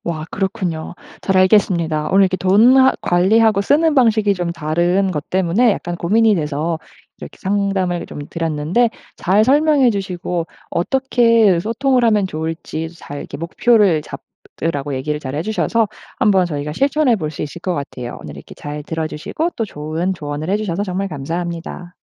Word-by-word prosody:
와 155 -2 -3
그렇군요. 180 -4 -3 0.2
잘 190 -1 -1
알겠습니다. 175 -5 +2
오늘 195 +1 +5
이렇게 185 0 0
돈 215 +8 +5
하 265 0 +6
관리하고 200 +4 +3
쓰는 300 +8 +3
방식이 220 -5 +3
좀 175 -2 -3
다른 175 +5 0
것 150 -4 -4
때문에 190 +5 +3
약간 175 -2 -4
고민이 215 +5 +3
돼서 155 +1 -2 0.4
이렇게 - - -10
상담을 195 -3 -1
좀 - - -8
드렸는데 165 +8 0 0.3
잘 200 +4 +3
설명해 285 -1 +4
주시고 180 -4 -3 0.2
어떻게 230 -3 +3
소통을 245 +4 +1
하면 210 -4 +3
좋을지 160 0 -4
"잘 145 -4 -9
이렇게 140 - -7
목표를 180 0 +2
잡으라."고 145 -3 -6
얘기를 150 +3 -2
잘 130 -1 -6
해 155 - -1
주셔서 220 +1 0 0.3
한번 195 -6 +3
저희가 150 -2 -4
실천해 275 - +2
볼 155 -5 -3
수 155 - -6
있을 150 +3 -7
것 180 -1 -2
같아요. 125 -4 -6
오늘 75 -1 -9
이렇게 70 - -12
잘 150 0 -7
들어주시고 160 - -3
또 225 - -1
좋은 165 +2 -3
조언을 150 0 -5
해 205 - +2
주셔서 200 -2 -2
정말 195 +1 -3
감사합니다. 170 +3 -5
180 Hz, 360 characters per minute, -18 LUFS, 160-215 Hz, 0.4 s, 하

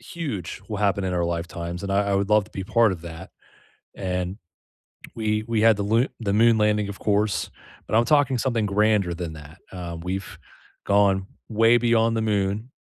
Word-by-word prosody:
huge 125 - -6
will 105 -2 -4
happen 100 -1 +1
in 90 - -1
our 85 -1 0
lifetimes, 85 +1 -4
and 100 0 -3
I 100 +1 +1
I 100 - +1
would 100 +1 0
love 105 -1 +4
to 105 - -19
be 95 - -5
part 115 0 +3
of 85 - -8
that, 85 -1 -9 0.7
and 90 0 -3 0.8
we 110 -1 -1
we 115 -2 0
had 110 -2 +5
the 100 - -2
loo 115 +5 +2
the 105 -4 -1
moon 115 +2 +5
landing, 105 -1 +1
of 100 - -8
course, 105 0 0 0.4
but - - -1
I'm 115 +1 +4
talking 140 -2 +3
something 115 -3 0
grander 105 -3 +2
than 85 -1 -5
that. 75 +1 -12
Uh, 85 -3 -6
we've 95 +2 -5 0.5
gone 100 -1 +3 0.2
way 115 +2 +4
beyond 115 -1 +2
the - - 0
moon 105 +2 -1
100 Hz, 190 wpm, -24 LUFS, 95-110 Hz, 0.8 s, had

